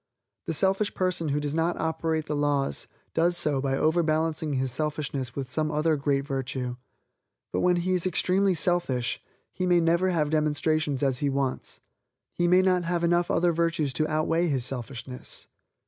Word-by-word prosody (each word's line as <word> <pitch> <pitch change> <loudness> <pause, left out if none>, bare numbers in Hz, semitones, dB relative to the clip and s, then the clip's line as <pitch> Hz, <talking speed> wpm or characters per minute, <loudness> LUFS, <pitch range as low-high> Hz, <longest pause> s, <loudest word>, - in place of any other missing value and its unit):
The 165 - -1
selfish 195 +4 +1
person 180 -3 0
who 145 +1 0
does 145 0 -3
operate 160 -1 -1
the 150 - -2
laws, 145 -1 0 0.3
does 175 +2 +2
so 145 -5 +1
by 135 -1 0
overbalancing 155 -1 +1
his 130 -1 0
selfishness 140 -3 -3
with 135 -2 -5
some 155 -1 0
other 155 +1 +2
great 140 -1 0
virtue. 130 -3 -3 0.8
But - - +1
when 180 0 +3
he 180 +2 0
is 180 0 +1
extremely 185 +2 +2
selfish, 150 -9 0 0.3
he 185 - -2
may 175 -1 +4
never 170 +3 +2
have 155 -4 0
demonstrations 150 -2 0
as 130 -3 +1
he 145 - +1
wants; 135 -1 -3 0.5
he 175 - +1
may 180 +2 +5
not 185 -1 +3
have 170 0 -1
enough 175 +1 +2
other 175 0 +2
virtues 165 -4 0
to 155 +2 0
outweigh 165 +2 +1
his 135 -6 +2
selfishness. 125 0 -5
155 Hz, 165 wpm, -27 LUFS, 140-175 Hz, 0.8 s, may